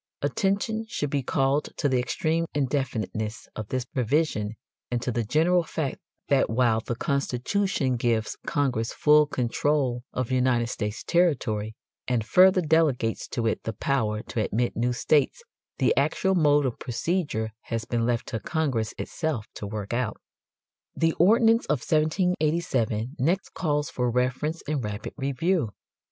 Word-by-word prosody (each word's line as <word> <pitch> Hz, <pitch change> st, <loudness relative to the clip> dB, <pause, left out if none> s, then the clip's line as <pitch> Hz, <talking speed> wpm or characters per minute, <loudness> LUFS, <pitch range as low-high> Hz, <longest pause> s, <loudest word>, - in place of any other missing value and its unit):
Attention 205 Hz, +3 st, 0 dB
should 145 Hz, -10 st, -2 dB
be 140 Hz, -, +1 dB
called 135 Hz, +3 st, +1 dB
to 145 Hz, -, +1 dB
the 130 Hz, -2 st, +2 dB
extreme 160 Hz, +6 st, 0 dB
indefiniteness 120 Hz, -6 st, -2 dB
of 110 Hz, -, -5 dB
this 130 Hz, +1 st, -2 dB
provision 125 Hz, -4 st, 0 dB, 0.3 s
and 120 Hz, -, 0 dB
to 125 Hz, +1 st, -2 dB
the 120 Hz, 0 st, -1 dB
general 165 Hz, +10 st, +3 dB
fact 160 Hz, -4 st, -3 dB, 0.3 s
that 140 Hz, -2 st, +3 dB
while 115 Hz, -1 st, +2 dB
the 120 Hz, +1 st, -4 dB
Constitution 140 Hz, -, 0 dB
gives 115 Hz, -2 st, 0 dB
Congress 130 Hz, -7 st, 0 dB
full 150 Hz, 0 st, +5 dB
control 130 Hz, 0 st, 0 dB
of 130 Hz, -1 st, -3 dB
United 125 Hz, -2 st, +2 dB
States 105 Hz, -1 st, -4 dB
territory 120 Hz, -11 st, +1 dB, 0.3 s
and 120 Hz, -3 st, 0 dB
further 185 Hz, -, +6 dB
delegates 150 Hz, -8 st, +1 dB
to 115 Hz, -, -3 dB
it 110 Hz, -, 0 dB
the 110 Hz, -, -4 dB
power 110 Hz, -6 st, -1 dB
to 110 Hz, -, -2 dB
admit 120 Hz, +4 st, -1 dB
new 120 Hz, +2 st, +1 dB
states, 145 Hz, -, +1 dB, 0.3 s
the -, -, +2 dB
actual 190 Hz, 0 st, +2 dB
mode 145 Hz, -5 st, +4 dB
of 125 Hz, -, -2 dB
procedure 120 Hz, -, -2 dB
has 115 Hz, -1 st, -3 dB
been 115 Hz, -1 st, -1 dB
left 120 Hz, 0 st, 0 dB
to 110 Hz, -, -3 dB
Congress 130 Hz, -, -1 dB
itself 155 Hz, -10 st, -3 dB
to 105 Hz, -, -6 dB
work 105 Hz, 0 st, -5 dB
out. 120 Hz, -3 st, -1 dB, 0.8 s
The 165 Hz, -1 st, +2 dB
ordinance 225 Hz, +5 st, +5 dB
of 150 Hz, -5 st, 0 dB
1787 155 Hz, -, +1 dB
next 175 Hz, +9 st, 0 dB
calls 150 Hz, -5 st, -1 dB
for 125 Hz, -1 st, 0 dB
reference 130 Hz, +6 st, -1 dB
and 145 Hz, -4 st, -1 dB
rapid 105 Hz, -1 st, -5 dB
review. 140 Hz, -, 0 dB
130 Hz, 145 wpm, -26 LUFS, 115-155 Hz, 0.8 s, further